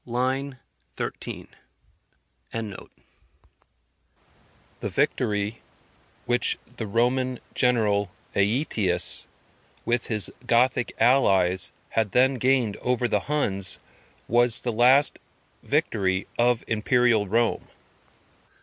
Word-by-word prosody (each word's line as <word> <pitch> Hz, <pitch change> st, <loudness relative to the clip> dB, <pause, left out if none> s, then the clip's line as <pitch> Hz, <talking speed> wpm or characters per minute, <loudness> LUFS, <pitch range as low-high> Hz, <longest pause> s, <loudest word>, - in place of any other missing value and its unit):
line 130 Hz, +3 st, -2 dB, 0.4 s
13.] -, -, -7 dB, 1.0 s
The 110 Hz, -4 st, -7 dB, 1.9 s
victory 105 Hz, +2 st, -1 dB, 0.6 s
which 120 Hz, 0 st, +2 dB, 0.2 s
the 110 Hz, -, -5 dB
Roman 125 Hz, +4 st, 0 dB
general 105 Hz, -6 st, +1 dB, 0.2 s
Aetius, 100 Hz, -, +1 dB, 0.6 s
with 120 Hz, 0 st, 0 dB
his 105 Hz, -5 st, +1 dB, 0.2 s
Gothic 125 Hz, 0 st, +2 dB
allies, 95 Hz, -8 st, +3 dB, 0.2 s
had 110 Hz, -4 st, -2 dB
then 130 Hz, +1 st, +3 dB
gained 125 Hz, -4 st, +1 dB
over 125 Hz, -1 st, -1 dB
the -, -, 0 dB
Huns, 100 Hz, -11 st, +1 dB, 0.5 s
was 120 Hz, 0 st, +5 dB
the 120 Hz, -, -2 dB
last 130 Hz, +5 st, +5 dB, 0.4 s
victory 95 Hz, -1 st, -1 dB
of 120 Hz, 0 st, +1 dB
Imperial 115 Hz, -1 st, +1 dB
Rome. 115 Hz, +4 st, 0 dB
120 Hz, 85 wpm, -24 LUFS, 105-125 Hz, 1.9 s, was